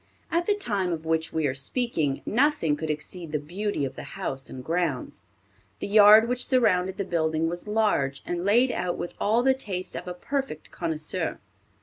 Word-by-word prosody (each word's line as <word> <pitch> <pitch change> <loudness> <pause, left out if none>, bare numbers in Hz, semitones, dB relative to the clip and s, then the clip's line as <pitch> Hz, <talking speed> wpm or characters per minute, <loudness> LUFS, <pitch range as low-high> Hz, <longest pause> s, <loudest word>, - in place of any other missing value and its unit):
At 340 +1 +1
the 415 - +3
time 200 - -1
of 160 -1 -4
which 160 0 0
we 160 -1 0
are 135 - +1
speaking, 150 - -1
nothing 255 - +2
could 160 +1 -5
exceed 155 +2 -5
the 155 - +1
beauty 175 +2 -3
of 135 0 -6
the - - -7 0.2
house 135 0 -3
and 130 - -8
grounds. 165 -4 -2 0.5
The - - -5
yard 215 +2 +7
which 250 +1 +1
surrounded 190 -8 +2
the 200 - -2
building 160 -2 0
was 175 +4 -5
large, 210 -11 +1
and 175 0 -3
laid 240 +6 +4
out 180 -1 -2
with 175 - -5
all 225 +4 +3
the 265 0 +5
taste 195 -8 -4
of - - -6
a 180 - -4
perfect 270 - -4
connoisseur. 160 +1 -2
180 Hz, 190 wpm, -26 LUFS, 155-220 Hz, 0.5 s, yard